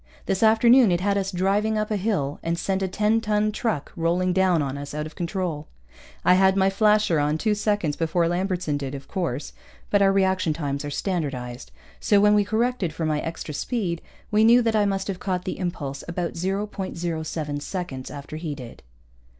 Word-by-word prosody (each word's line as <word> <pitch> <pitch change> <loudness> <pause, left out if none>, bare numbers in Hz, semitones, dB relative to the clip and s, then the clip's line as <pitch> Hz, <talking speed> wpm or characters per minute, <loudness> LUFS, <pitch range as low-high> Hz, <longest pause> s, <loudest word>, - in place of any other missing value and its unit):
This 190 - -1
afternoon 225 +1 +6
it 175 - +2
had 200 +2 +1
us 195 -1 0
driving 200 +4 +1
up 215 0 -2
a - - +2
hill, 180 -9 -1
and 170 +1 -1
sent 190 +2 -1
a 190 - 0
ten 210 +4 +1
ton 215 -1 +1
truck 215 - -2
rolling 180 +2 +1
down 185 -2 +3
on 135 -1 -3
us 145 +1 -7
out 150 0 -2
of 155 - -9
control. 170 -4 -3 0.6
I - - +7
had 190 +1 +4
my 190 0 +3
flasher 210 -4 +3
on 150 +1 +1
two 215 +6 +1
seconds 205 -7 0
before 165 +1 +1
Lambertson 175 -3 -1
did, 140 -1 -5
of 135 0 -9
course, 165 -8 -3 0.4
but 205 - +4
our 195 -1 +5
reaction 190 -4 +2
times 140 -2 -3
are 145 - -4
standardized, 140 -8 -3 0.3
so 205 - +3
when 210 +1 +5
we 210 0 +4
corrected 220 -4 0
for 160 - -3
my 155 -1 0
extra 165 -2 -5
speed, 175 - -2 0.3
we 210 +1 +4
knew 240 +2 +6
that 225 -1 +1
I 210 -1 +3
must 195 -1 -1
have 190 -3 -4
caught 180 -2 -2
the 185 - -4
impulse 145 -7 -4
about 170 0 -3
0.07 170 -5 -3
seconds 145 -7 -5
after 145 +1 -7
he 155 -2 -4
did. 125 -4 -10
185 Hz, 195 wpm, -24 LUFS, 155-205 Hz, 0.6 s, I